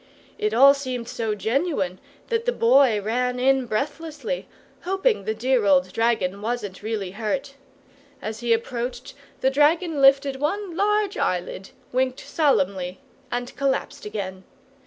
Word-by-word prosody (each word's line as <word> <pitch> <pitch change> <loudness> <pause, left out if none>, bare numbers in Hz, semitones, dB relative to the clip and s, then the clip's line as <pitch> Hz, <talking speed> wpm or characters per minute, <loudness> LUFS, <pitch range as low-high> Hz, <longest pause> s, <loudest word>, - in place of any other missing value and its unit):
It 210 - 0
all 270 +5 +7
seemed 255 -4 -4
so 225 -3 -2
genuine 215 - -1 0.3
that 460 -1 0
the - - +2
Boy 245 - +4
ran 250 +4 -1
in 265 0 +3
breathlessly, 300 - -3 0.3
hoping 390 +5 0
the 220 - -1
dear 250 +1 +1
old 185 -1 +3
dragon 220 -4 0
wasn't 215 -4 -4
really 210 -3 -3
hurt. 235 +7 -3 0.7
As 215 0 -5
he 240 -1 -1
approached, 235 +2 -2 0.3
the 265 - +3
dragon 300 +2 +2
lifted 275 0 +5
one 345 +5 -2
large 415 +1 +1
eyelid, 180 +1 -2 0.2
winked 255 0 0
solemnly, 190 - 0 0.3
and 245 0 -3
collapsed 275 -1 -1
again. 190 -3 -5
250 Hz, 135 wpm, -24 LUFS, 215-285 Hz, 0.7 s, all